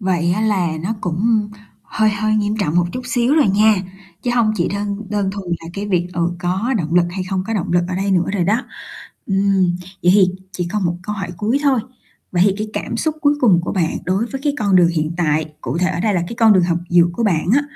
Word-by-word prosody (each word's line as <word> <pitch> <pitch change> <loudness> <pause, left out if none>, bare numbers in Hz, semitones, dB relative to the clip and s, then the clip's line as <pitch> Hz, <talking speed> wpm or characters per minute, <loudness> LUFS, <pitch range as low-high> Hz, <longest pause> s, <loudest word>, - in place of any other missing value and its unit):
vậy 175 -3 +1
á 195 - -1
là 205 -5 +1
nó 215 +5 -2
cũng 210 +4 0 0.3
hơi 215 -1 +1
hơi 215 +1 0
nghiêm 210 0 0
trọng 160 -3 0
một 175 0 +3
chút 255 - -4
xíu 245 +2 +1
rồi 300 -8 +4
nha, 210 +2 +4 0.5
chứ 245 - -1
hông 230 -3 +2
chỉ 170 - 0
đơn 200 0 -3
đơn 205 -2 0
thuần 195 -2 -7
là 165 - -9
cái 200 +1 -4
việc, 180 -3 0
ừ, 170 -1 0
có 190 +9 -1
động 160 -1 -2
lực 175 -1 +5
hay 185 0 -4
không 185 0 -2
có 225 - -2
động 180 -5 -2
lực 175 0 +3
ở 185 - -3
đây 195 +1 -1
nữa 180 -2 +3
rồi 180 -4 +1
đó. 215 +7 +1 0.6
Ừm, 195 -2 +2 0.3
vậy 180 - +5
thì 200 -2 +6 0.3
chỉ 175 -3 -3
còn 210 -2 -1
một 175 0 0
câu 210 +2 -4
hỏi 195 -3 -5
cuối 220 +9 0
thôi, 270 -4 +3 0.5
vậy 175 0 +3
thì 195 - +2
cái 215 +1 -3
cảm 235 - -4
xúc 310 +6 -1
cuối 290 -1 +3
cùng 190 -9 +4
của 175 - -4
bạn 170 -5 0
đối 190 +5 0
với 270 +2 -6
cái 290 - +2
con 200 -3 +2
đường 175 -2 +5
hiện 160 -1 -1
tại, 155 -3 +1 0.2
cụ - - -3
thể 180 +1 +2
ở 175 -2 -3
đây 210 +1 +1
là 180 - +1
cái - - -6
con 225 -2 +6
đường 185 -3 +4
học 170 -1 0
dược 175 -1 +4
của 205 - -3
bạn 170 -7 +1
á 285 - +3
195 Hz, 255 wpm, -19 LUFS, 175-215 Hz, 0.6 s, thì